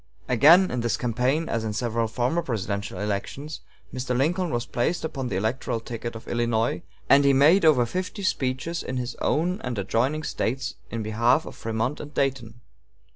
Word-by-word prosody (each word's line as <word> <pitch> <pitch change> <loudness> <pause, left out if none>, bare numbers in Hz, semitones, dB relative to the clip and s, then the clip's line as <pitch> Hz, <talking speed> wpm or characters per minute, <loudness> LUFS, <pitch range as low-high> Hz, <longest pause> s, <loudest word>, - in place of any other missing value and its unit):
Again, 160 +10 +6
in 125 - -1
this 120 0 0
campaign, 125 +7 0
as 115 -1 -1
in 110 -1 -2
several 115 +1 -1
former 125 +9 0
presidential 100 - -3
elections, 105 +9 -4 0.3
Mr. 125 -1 -2
Lincoln 170 +6 +1
was 120 -4 -2
placed 160 +8 -1
upon 135 -5 -4
the 95 - -3
electoral 110 +3 -1
ticket 115 0 -6
of 115 - -10
Illinois, 115 -5 0 0.3
and 140 +1 +6
he 140 0 +5
made 155 +8 +5
over 145 -7 +5
fifty 185 - -4
speeches 135 0 -1
in 130 - -4
his 125 0 -3
own 175 +5 0
and 125 -3 -3
adjoining 125 +10 0
States 130 -2 -2 0.2
in 115 -1 -3
behalf 115 +8 +2
of - - -9
Frémont 115 +5 -2
and 150 0 -9
Dayton. 120 -4 -1
125 Hz, 175 wpm, -25 LUFS, 115-150 Hz, 0.3 s, Again